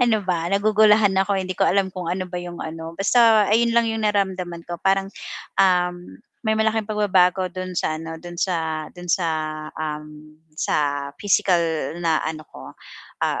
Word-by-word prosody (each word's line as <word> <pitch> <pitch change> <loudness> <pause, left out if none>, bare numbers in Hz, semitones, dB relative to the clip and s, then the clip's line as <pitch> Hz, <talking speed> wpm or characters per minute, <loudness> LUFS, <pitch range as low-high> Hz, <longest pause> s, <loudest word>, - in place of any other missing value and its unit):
ano 230 -3 +3
ba? 170 -1 -1
Nagugulahan 210 0 +4
ako 195 0 0
hindi 185 0 -3
ko - - -1
alam 195 +1 +3
kung 175 -2 -4
ano 185 0 -2
ba 180 - -11
'yong 175 -1 -8
ano, 165 +1 -7
basta 220 0 +5
ayun 230 +3 +3
lang 235 0 +3
'yung 225 -1 -2
naramdaman 190 -5 -1
ko 175 - -5
parang, 195 0 +2 0.6
um, 180 - 0 0.2
may 220 -1 +1
malaking 220 0 +1
pagbabago 190 -3 +3
do'n 185 +1 -6
sa 155 - -1
ano, 160 0 -7
do'n 175 +1 -9
sa, 160 -4 -1
do'n 180 0 -11
sa, 175 0 +1 0.5
um, 150 0 -6 0.2
sa 145 -1 0
physical 190 -3 +2 0.4
na 160 -2 +2
ano 155 -1 -4
ko, 65 - -11 0.5
ah, - - 0
185 Hz, 165 wpm, -22 LUFS, 165-205 Hz, 0.6 s, basta